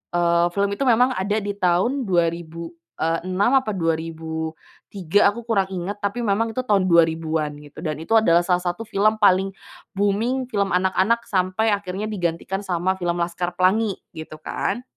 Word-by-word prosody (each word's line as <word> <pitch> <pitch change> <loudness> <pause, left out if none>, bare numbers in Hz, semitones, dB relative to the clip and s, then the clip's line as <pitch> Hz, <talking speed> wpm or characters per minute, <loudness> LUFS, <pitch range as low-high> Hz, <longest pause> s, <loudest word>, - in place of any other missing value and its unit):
eee, 170 0 +3
film 200 +2 0
itu 275 - -2
memang 250 0 +4
ada 205 +3 -1
di 205 0 -4
tahun 200 +9 +1
2006 170 +3 -1
apa 215 - -3
2003 165 +3 -1
aku 235 +2 -8
kurang 195 -5 +1
ingat, 190 +3 -4
tapi 200 +4 -1
memang 225 +2 +1
itu 255 +2 -3
tahun 205 -6 +2
2000-an 160 -2 +2
gitu, 150 0 -13
dan 155 -2 -2
itu 165 - -10
adalah 170 -6 +5
salah 180 0 +1
satu 175 +5 -3
film 215 +2 +1
paling 195 -2 +4 0.4
booming, 225 +6 0
film 200 -2 0
anak-anak 190 +5 +1
sampai 195 +2 +1
akhirnya 200 +1 -5
digantikan 190 0 -3
sama 185 0 0
film 175 0 -1
Laskar 175 +1 -2
Pelangi 195 +3 +2 0.2
gitu, 160 -1 -8
kan. 240 +9 -3
185 Hz, 150 wpm, -22 LUFS, 170-205 Hz, 0.4 s, adalah